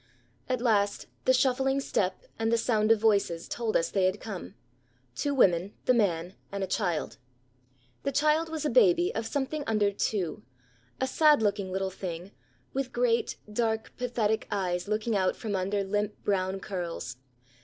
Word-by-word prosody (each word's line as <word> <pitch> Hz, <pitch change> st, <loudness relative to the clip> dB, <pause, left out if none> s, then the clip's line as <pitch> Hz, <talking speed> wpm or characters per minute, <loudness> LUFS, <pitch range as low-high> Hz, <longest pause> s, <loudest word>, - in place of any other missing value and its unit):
At 255 Hz, -2 st, 0 dB
last 205 Hz, -4 st, +2 dB, 0.2 s
the -, -, +5 dB
shuffling 265 Hz, +1 st, +2 dB
step 190 Hz, -8 st, -1 dB, 0.2 s
and 225 Hz, 0 st, +1 dB
the 230 Hz, -, +4 dB
sound 220 Hz, -2 st, +2 dB
of 225 Hz, -, +5 dB
voices 200 Hz, -6 st, +2 dB
told 230 Hz, -2 st, 0 dB
us 165 Hz, -, -1 dB
they 195 Hz, -2 st, +2 dB
had 185 Hz, +2 st, +1 dB
come 185 Hz, -, -7 dB, 0.6 s
two 285 Hz, -, -1 dB
women, 190 Hz, -4 st, +3 dB
the 255 Hz, -, +5 dB
man, 180 Hz, -6 st, +1 dB, 0.2 s
and 200 Hz, -1 st, -3 dB
a -, -, +1 dB
child. 180 Hz, -5 st, -1 dB, 0.8 s
The 280 Hz, -, -1 dB
child 305 Hz, +3 st, +2 dB
was 315 Hz, -2 st, -4 dB
a -, -, +1 dB
baby 360 Hz, -7 st, +4 dB
of 225 Hz, 0 st, -2 dB
something 285 Hz, +3 st, -2 dB
under 210 Hz, -2 st, +2 dB
two, 195 Hz, -5 st, -2 dB, 0.6 s
a 260 Hz, -, +1 dB
sad 300 Hz, -1 st, +4 dB
looking 200 Hz, -2 st, 0 dB
little 190 Hz, 0 st, -1 dB
thing, 180 Hz, 0 st, -6 dB, 0.4 s
with 265 Hz, -1 st, -2 dB
great, 240 Hz, -1 st, +1 dB, 0.2 s
dark, 220 Hz, -1 st, -1 dB
pathetic 230 Hz, -3 st, 0 dB
eyes 180 Hz, -3 st, -1 dB
looking 215 Hz, +1 st, 0 dB
out 190 Hz, -2 st, +2 dB
from 210 Hz, -3 st, -3 dB
under 195 Hz, +2 st, 0 dB
limp 205 Hz, +2 st, -1 dB
brown 190 Hz, -1 st, 0 dB
curls. 170 Hz, -10 st, -5 dB
210 Hz, 165 wpm, -29 LUFS, 190-250 Hz, 0.8 s, the